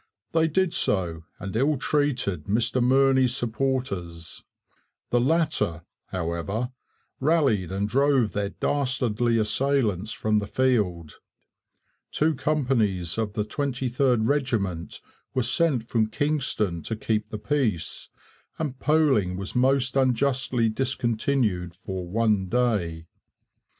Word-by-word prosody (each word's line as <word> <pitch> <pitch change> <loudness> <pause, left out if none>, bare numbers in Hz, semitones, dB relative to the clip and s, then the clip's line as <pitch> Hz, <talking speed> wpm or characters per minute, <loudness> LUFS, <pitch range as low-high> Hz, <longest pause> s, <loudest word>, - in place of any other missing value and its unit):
They 160 0 +3
did 185 +2 +1
so 85 -5 0
and 95 +2 -6
ill 140 +5 +2
treated 120 - 0
Mr 120 +4 +1
Murney's 130 0 +3
supporters. 110 -10 -3 0.7
The 120 - +4
latter, 145 - +1 0.2
however, 95 +8 -3 0.5
rallied 135 - +2
and 100 +2 -1
drove 135 -1 +2
their 100 -1 -2
dastardly 120 -4 0
assailants 110 -3 +1
from 110 -1 +1
the 100 - -4
field. 105 - 0 0.9
Two 155 +1 +2
companies 125 - 0
of 105 -2 -2
the 105 0 -1
23rd 125 -3 0
Regiment 110 - -1 0.3
were 130 - +2
sent 125 -2 +1
from 110 -2 +1
Kingston 125 - -1
to 110 - -4
keep 110 0 -1
the 110 - -5
peace, 110 - -2 0.5
and 140 -5 -4
polling 135 - +2
was 95 +1 -5
most 130 +1 +2
unjustly 130 -2 +2
discontinued 115 -6 0
for 95 0 -6
one 105 -2 +1
day.' 100 -10 0
120 Hz, 110 wpm, -25 LUFS, 100-135 Hz, 0.9 s, The